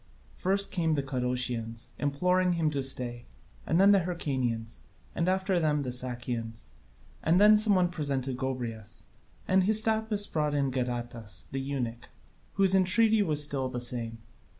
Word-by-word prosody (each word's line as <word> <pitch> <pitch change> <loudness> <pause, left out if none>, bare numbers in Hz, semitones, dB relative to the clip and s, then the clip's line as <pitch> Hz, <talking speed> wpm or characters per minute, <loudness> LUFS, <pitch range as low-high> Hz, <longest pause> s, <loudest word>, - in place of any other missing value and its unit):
First 195 +2 0
came 165 -3 0
the 140 - -1
Cadousians, 125 -3 -3
imploring 180 +6 +1
him 160 -3 0
to 140 -2 -1
stay, 125 -3 -2 0.4
and 165 - +2
then 200 +1 +6
the 200 - +5
Hyrcanians, 130 -10 -3 0.3
and 170 +2 0
after 190 -1 +1
them 150 -3 +1
the 125 - -3
Sakians, 120 -2 -2 0.5
and 170 +3 +3
then 210 +1 +7
some 210 -1 +4
one 180 -1 +2
presented 140 -6 -2
Gobryas, 120 -5 -5 0.4
and 190 +1 +4
Hystaspas 220 0 +2
brought 150 -5 -1
in 140 -2 0
Gadatas 120 -6 -4
the 135 - -3
eunuch, 125 -4 -4 0.4
whose 195 -1 +3
entreaty 210 +4 +4
was 155 -6 +1
still 140 -3 -1
the 125 -1 -4
same. 120 -2 -3
140 Hz, 150 wpm, -29 LUFS, 125-185 Hz, 0.5 s, then